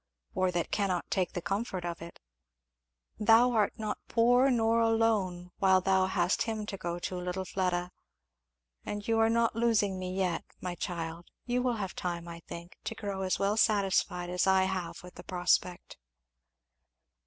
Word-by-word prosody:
"Or 185 0 +1
that 175 -1 -2
cannot 190 -4 -1
take 185 -2 0
the 175 - -4
comfort 195 -2 -2
of 170 -1 -4
it. 170 0 -10 1.0
Thou 225 +4 +5
art 215 -4 +2
not 215 -1 -3
poor 245 +3 +4
nor 230 -2 +2
alone 220 -6 +1
while 190 -2 +5
thou 190 0 +2
hast 180 -1 +1
him 220 -2 -2
to 205 - -5
go 175 -1 -3
to, 180 +1 -4
little 180 +1 -3
Fleda. 180 -1 -1 0.9
And 205 0 -5
you 225 0 +2
are 225 0 +4
not 230 0 +2
losing 215 -5 +2
me 185 0 -4
yet, 185 -3 0 0.2
my 180 -1 -4
child; 170 -1 -5 0.2
you 245 0 0
will 245 -1 +1
have 195 -4 -4
time, 170 -1 -4
I 170 0 -8
think, 170 +1 -9
to 225 - -3
grow 200 -3 -4
as 185 -1 0
well 200 +2 +1
satisfied 195 -4 +2
as 180 +1 +1
I 190 0 +4 0.4
with 180 - -11
the - - -11
prospect." 180 0 0
190 Hz, 165 wpm, -30 LUFS, 180-225 Hz, 1.0 s, Thou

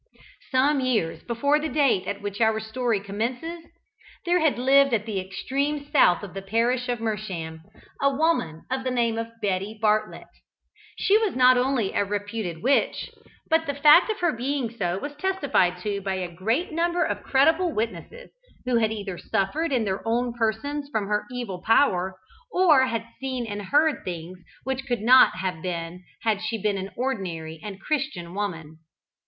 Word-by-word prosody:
Some 275 +2 +3
years 235 -11 0
before 280 +6 +1
the 310 +1 -3
date 275 -12 +2
at 200 0 -4
which 205 +1 -4
our 220 -1 +3
story 220 0 -1
commences, 240 +12 -4 0.6
there 350 +1 +3
had 315 -6 +2
lived 270 0 +4
at 210 -1 -2
the 210 -4 -2
extreme 280 +10 -2
south 180 - +4
of 195 - -8
the 195 - -5
parish 235 +5 0
of 245 - 0
Mersham 190 -8 -4 0.4
a 280 - +4
woman 275 - 0
of 260 0 -1
the 260 - -1
name 235 -2 0
of 230 - -3 0.2
Betty 200 +2 -1
Bartlet. 215 0 0 0.7
She 415 +2 +4
was 435 -5 -1
not 255 0 +6
only 250 -5 +1
a - - +2
reputed 205 -4 -4
witch, 275 +2 +1 0.4
but 320 0 +2
the 285 - -2
fact 300 +7 +6
of 430 -3 -2
her 345 -2 +3
being 250 -1 -3
so 180 -4 -1
was 290 +8 -5
testified 290 - +1
to 200 -1 -2
by 195 0 -2
a 180 -2 -4
great 225 - -1
number 345 +2 +1
of - - -3
credible 320 +6 +3
witnesses 235 - -5 0.3
who 250 -1 +2
had 220 -1 +2
either 200 -5 -5
suffered 300 +13 -1
in 250 -4 +2
their 190 -1 -2
own 240 +1 0
persons 260 +6 -2
from 215 -7 -2
her 210 0 0
evil 230 -8 -5
power, 190 -5 +2 0.3
or 315 -9 +5
had 230 -2 -2
seen 260 -2 -3
and 205 -2 -5
heard 300 +7 +2
things 175 +1 -6 0.2
which 265 0 -3
could 240 -4 -1
not 250 0 +6
have 185 -3 -3
been 175 0 -5 0.2
had 215 -3 +1
she 220 +1 -2
been 205 -1 0
an 190 +1 -5
ordinary 175 -11 -3
and 200 -2 -7
Christian 270 - -3
woman. 165 -6 -5
230 Hz, 175 wpm, -25 LUFS, 195-275 Hz, 0.7 s, not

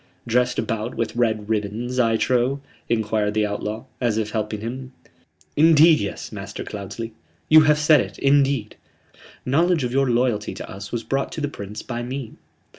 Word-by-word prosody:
"Dressed 125 +1 +1
about 115 +1 -2
with 115 0 -2
red 110 -3 0
ribbons, 110 +4 -2
I 115 -2 +3
trow?" 125 +4 +1 0.3
enquired 110 -2 0
the 110 -1 +2
outlaw, 105 +2 -4 0.2
as 115 -3 +1
if 110 -1 -1
helping 105 -1 -3
him. 130 +3 -6 0.6
"Indeed 160 +1 +6
yes, 100 - -5
Master - - -6
Cloudesley. 105 +3 -6 0.4
You 155 0 +9
have 150 - +5
said 150 -2 +5
it, - - -7
indeed. 135 -5 +2 0.7
Knowledge 160 +4 +2
of 125 - -1
your 135 0 +2
loyalty 120 -3 0
to - - -7
us 100 +1 -8
was 120 -1 -3
brought 135 +4 -1
to 155 - -4
the 145 - 0
Prince 105 -6 -7
by 120 -1 -4
me. 125 0 -5
120 Hz, 170 wpm, -23 LUFS, 110-135 Hz, 0.7 s, You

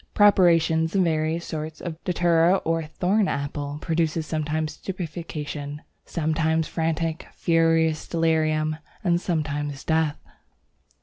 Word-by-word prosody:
Preparations 165 -4 +4
of 190 - +4
various 160 0 0
sorts 155 -1 -5
of 165 -2 -7
Datura 175 0 +3
or 165 0 +1
Thorn 190 +6 +1
apple 145 +1 -3
produce 165 -1 0
sometimes 155 0 -2
stupefaction, 155 -5 -6 0.2
sometimes 160 0 0
frantic, 165 0 -2
furious 165 -1 +2
delirium, 155 -2 +1 0.3
and 175 -2 +2
sometimes 145 -5 -2
death. 160 -2 +1
160 Hz, 105 wpm, -25 LUFS, 155-170 Hz, 0.3 s, Preparations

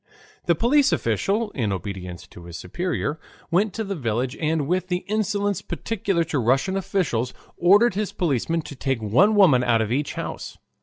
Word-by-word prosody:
The 170 - +4
police 275 - +3
official, 200 - 0
in 115 - -1
obedience 90 -1 -6
to 85 - -13
his 85 -1 -8
superior, 155 - -3 0.3
went 195 +5 +2
to 225 - -3
the 200 -1 -3
village 125 - -2
and 155 -2 0
with 185 +2 0
the 180 0 -2
insolence 205 -1 0
peculiar 190 0 -1
to 160 -3 -2
Russian 135 - +1
officials 160 - -1 0.2
ordered 205 +6 +5
his 205 +1 -2
policemen 165 0 -1
to 145 - -9
take 135 -2 -1
one 135 - +3
woman 165 -12 +5
out 120 -2 +3
of 110 - -4
each 140 +3 -1
house. - - -6
165 Hz, 170 wpm, -23 LUFS, 120-195 Hz, 0.3 s, ordered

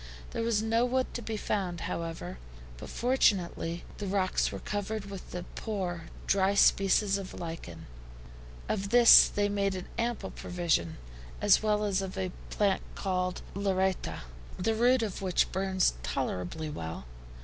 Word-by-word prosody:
There - - -3
was 230 -2 +1
no 225 +1 +2
wood 255 +1 0
to 240 - -4
be 220 -1 -4
found, 185 -5 -2
however, 165 - -4 0.4
but - - -9
fortunately 190 -9 +1 0.2
the 205 - -3
rocks 190 -1 +1
were - - -5
covered 205 0 -4
with 195 -2 -9
a 180 - -3
poor, 185 -6 -3 0.2
dry 195 0 +2
species 195 0 +4
of 190 -1 -8
lichen. 165 -1 -7 0.8
Of 195 -1 -2
this 240 +1 +9
they 205 0 0
made 200 -1 0
an 185 - -5
ample 235 0 -2
provision, 165 - -1 0.4
as 205 -2 +5
well 210 -1 +1
as 200 -2 +1
of 190 -1 -6
a 185 -1 -2 0.2
plant 200 -2 +1
called 185 -2 -2
LLARETTA, 190 -1 -1 0.4
the 220 +5 +1
root 240 +2 +3
of 205 -4 -4
which 185 -3 +1
burns 190 - +1
tolerably 95 - -3
well. 80 - -6
195 Hz, 150 wpm, -30 LUFS, 180-210 Hz, 0.8 s, this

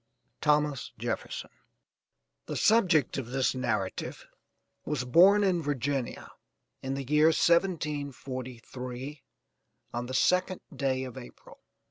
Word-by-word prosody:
THOMAS 150 -2 +1
JEFFERSON. - - -4 1.0
The - - -4
subject 180 - +3
of 125 - -5
this 130 +1 +1
narrative 110 -7 -3 0.6
was 140 -4 -2
born 190 +10 +6
in 185 -3 +2
Virginia, 140 -3 -2 0.5
in 135 0 -3
the 135 - -3
year 150 +4 +4
1743, 140 -6 -1 0.7
on 120 +1 -2
the 130 - -6
2nd 185 +5 +2 0.2
day 130 -2 0
of 130 0 -7
April. 120 - -14
140 Hz, 105 wpm, -29 LUFS, 130-155 Hz, 1.0 s, born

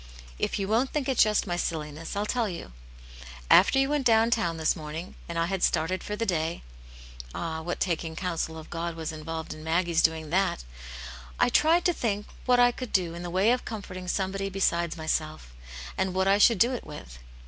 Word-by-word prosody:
" - - -18
If - - 0
you 195 -2 -2
won't 230 +6 +2
think 290 -3 -2
it 265 -3 0
just 210 -1 +4
my 175 -3 -2
silliness, 160 0 -4
I'll 205 +1 0
tell 230 -1 0
you. 170 - -7 0.8
After 200 +8 +7
you 270 0 +4
\irent 295 -2 +1
down 230 -1 +4
town 170 -8 +1
this 160 - +1
morning, 160 +3 -7 0.2
and 170 - -4
I 165 - +2
had 190 +1 -2
started 180 +3 +1
for 210 - -4
the 230 +2 -2
day 165 -4 -1 0.7
(ah, 160 -1 -3
what 175 +2 -4
taking 165 -2 -1
counsel 165 -2 -3
of 160 - -11
God 170 0 -3
was 160 -1 -4
involved 160 +1 -5
in 155 - -11
Maggie's 165 0 +2
doing 160 -2 +1
that 185 - +1 0.4
!), - - -9 0.3
I - - +4
tried 330 +3 +4
to 355 - +4
think 210 -7 -2 0.2
what 250 -1 +5
I 245 0 +6
could 255 0 -7
do 175 -3 +1
in 170 - -7
the 175 - -5
way 190 +6 +3
ti 250 - -7
comforting 185 -5 -7
somebody 195 +2 -1
besides 170 -3 0
myself, 155 - -3 0.5
and 190 -1 0
what 190 0 +2
I 200 +1 +4
should 230 +1 +6
do 240 +7 +3
it 245 - -4
with. - - -10
180 Hz, 215 wpm, -27 LUFS, 160-210 Hz, 0.8 s, After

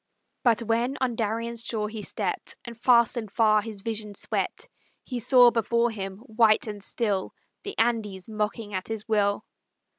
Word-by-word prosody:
But 235 -2 +3
when 235 +4 0
on 255 -2 0
Darien's 230 +1 -2
shore 215 -2 -2
he 215 0 -6
stept, - - -3
And 235 -1 -7
fast 235 0 +4
and 220 -4 -4
far 215 -1 +4
his 215 -2 -8
vision 215 -1 -4
swept, - - -2 0.4
He 250 -2 -4
saw 245 0 +6
before 235 +1 +1
him, 195 -3 -5
white 220 -2 +3
and 205 -2 -6
still, 205 -4 -2 0.3
The 405 - -7
Andes 215 -5 0
mocking 215 0 -3
at 185 -1 -3
his 220 -1 -5
will. 205 -2 +1
225 Hz, 160 wpm, -26 LUFS, 210-235 Hz, 0.4 s, saw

